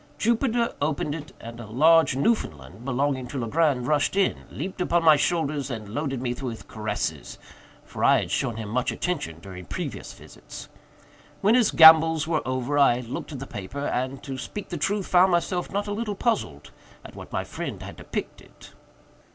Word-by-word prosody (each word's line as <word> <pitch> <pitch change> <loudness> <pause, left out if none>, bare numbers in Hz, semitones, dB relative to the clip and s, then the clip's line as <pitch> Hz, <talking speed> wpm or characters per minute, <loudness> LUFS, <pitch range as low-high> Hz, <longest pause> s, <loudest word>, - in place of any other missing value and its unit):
Jupiter 235 - +1
opened 145 0 -1
it, 155 -1 -7
and 115 +1 -9
a 115 - -8
large 160 +6 +4
Newfoundland, 105 - -1
belonging 135 0 -1
to 135 - -6
Legrand, 130 +1 +1
rushed 145 +4 +1
in, 195 -1 +1
leaped 185 +4 -6
upon 175 -1 +1
my 160 -2 +7
shoulders, 150 -3 0
and 110 -5 -5
loaded 135 +1 -3
me 120 -1 -1
with 120 -3 -6
caresses; 110 0 -4 0.5
for - - -6
I - - +5
had - - -6
shown 115 - -1
him 110 -2 -5
much 125 +3 0
attention 145 - -3
during 90 0 -10
previous - - -5
visits. - - -12 0.7
When 210 +3 +4
his 245 -3 +4
gambols 160 -1 +7
were 160 -2 +1
over, 130 +3 -1
I 125 -3 +4
looked 125 +6 -6
at - - -5
the 135 - -6
paper, 130 +3 -6
and, 130 0 -2
to 135 -2 -6
speak 205 +9 -7
the 175 - -4
truth, 195 +6 -1
found 185 +1 +4
myself 175 +1 0
not 205 +1 -1
a 205 - -3
little 210 -1 -3
puzzled 190 - -2 0.3
at - - -11
what - - -10
my - - -2
friend - - -6
had - - -9
depicted. - - -7
145 Hz, 180 wpm, -25 LUFS, 125-175 Hz, 0.7 s, my